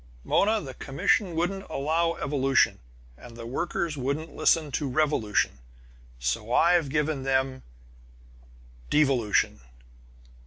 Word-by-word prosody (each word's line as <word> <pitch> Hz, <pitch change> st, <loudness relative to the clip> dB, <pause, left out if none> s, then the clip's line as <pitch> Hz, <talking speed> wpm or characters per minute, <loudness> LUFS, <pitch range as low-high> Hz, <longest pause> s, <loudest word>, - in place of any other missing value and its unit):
"Mona 215 Hz, +2 st, +2 dB
the 135 Hz, -8 st, -8 dB
commission 175 Hz, -, 0 dB
wouldn't 195 Hz, +4 st, -2 dB
allow 165 Hz, +4 st, 0 dB
evolution, 135 Hz, -1 st, +1 dB, 0.4 s
and 120 Hz, -1 st, -12 dB
the 115 Hz, -, -8 dB
workers 170 Hz, +5 st, -2 dB
wouldn't 140 Hz, +5 st, -3 dB
listen 155 Hz, -3 st, +2 dB
to 140 Hz, 0 st, -2 dB
revolution! 125 Hz, -, 0 dB, 0.6 s
So 65 Hz, -, -2 dB
I've 170 Hz, +1 st, +4 dB
given 150 Hz, 0 st, 0 dB
them 130 Hz, 0 st, 0 dB, 1.3 s
devolution!" 135 Hz, -8 st, +2 dB
145 Hz, 105 wpm, -27 LUFS, 130-165 Hz, 1.3 s, I've